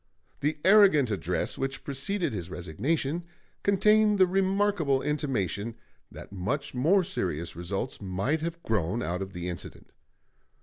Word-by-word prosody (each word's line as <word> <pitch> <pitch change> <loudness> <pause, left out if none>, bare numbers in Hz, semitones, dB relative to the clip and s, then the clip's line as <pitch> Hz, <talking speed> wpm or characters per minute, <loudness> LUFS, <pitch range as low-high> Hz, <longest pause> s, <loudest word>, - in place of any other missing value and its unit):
The 150 +2 0
arrogant 190 - +6
address 95 -6 -2
which 135 0 -3
preceded 175 - -2
his 90 -4 -5
resignation 135 - -2 0.4
contained 210 +1 +4
the 190 - +6
remarkable 190 -6 +1
intimation 115 - -1 0.4
that - - -11
much 100 +10 -3
more 165 +10 +3
serious 85 - -3
results 95 +9 -4
might 100 +11 -1
have 170 +1 -4
grown 110 +2 0
out 90 +2 -2
of 95 0 -5
the 90 0 -5
incident. 85 -1 -8
135 Hz, 130 wpm, -28 LUFS, -, 0.4 s, arrogant